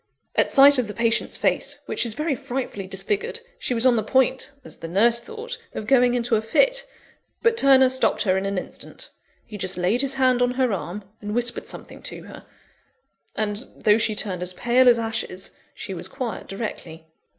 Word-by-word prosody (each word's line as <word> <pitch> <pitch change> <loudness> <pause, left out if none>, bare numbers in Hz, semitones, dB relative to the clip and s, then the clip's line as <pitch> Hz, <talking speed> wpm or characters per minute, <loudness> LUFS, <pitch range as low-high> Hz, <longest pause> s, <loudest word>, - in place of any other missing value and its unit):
At - - +3
sight 280 -1 +7
of 245 - -1
the 210 - -7
patient's 230 0 +1
face, - - 0
which - - 0
is 220 - -2
very 300 +1 -1
frightfully 245 -7 -5
disfigured, 195 - -3 0.2
she 250 - -1
was 230 +2 +1
on 250 -2 +5
the 220 - 0
point 260 +3 +1 0.2
(as - - -9
the 165 - -7
nurse 230 +7 +3
thought) 455 - -7 0.2
of 215 - -4
going 250 0 +4
into 235 -1 +1
a 215 - +1
fit; - - +2 0.6
but 460 -1 +4
Turner 270 - +6
stopped 260 0 +1
her 185 -3 +2
in 190 +1 -1
an 200 -1 -2
instant. - - -8 0.3
He 210 -3 -9
just 185 -1 -2
laid 185 +8 +2
his 275 -1 -1
hand 255 -2 +2
on 245 0 +1
her 255 -4 +1
arm, 195 +2 -5 0.2
and 210 +1 -4
whispered 240 0 -1
something - - -9
to - - -5
her; - - -12 0.9
and, 210 +1 -1
though 210 +1 +3
she 215 -1 +1
turned 190 -4 -1
as 180 0 0
pale 245 +5 +4
as 240 - +5
ashes, 225 -5 -3 0.2
she 195 - -6
was 180 0 -6
quiet 235 +4 -5
directly. 175 -6 -6
235 Hz, 195 wpm, -23 LUFS, 200-260 Hz, 0.9 s, sight